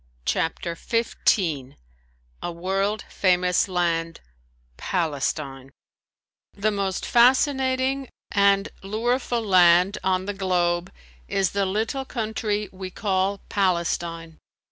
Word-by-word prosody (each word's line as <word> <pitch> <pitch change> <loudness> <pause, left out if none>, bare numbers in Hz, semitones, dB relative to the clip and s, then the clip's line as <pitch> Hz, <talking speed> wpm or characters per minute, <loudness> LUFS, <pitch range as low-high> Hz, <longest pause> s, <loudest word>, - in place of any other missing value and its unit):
CHAPTER 170 +1 -1
XV 170 - 0 0.7
A 175 - -3
WORLD 195 +4 -1
FAMOUS 180 -1 +2
LAND 170 -2 -1 0.6
PALESTINE 140 - -2 0.8
The 215 +2 0
most 195 -2 -2
fascinating 260 +1 +3 0.2
and 200 0 +3
lureful 235 +3 -1
land 180 0 +5
on 185 0 +1
the 205 - -3
globe 180 -2 0 0.4
is 195 -2 0
the 200 -1 0
little 225 +7 -2
country 215 -3 -2
we 185 0 -7
call 195 0 -1
Palestine. 170 -3 -1
190 Hz, 95 wpm, -24 LUFS, 175-215 Hz, 0.8 s, land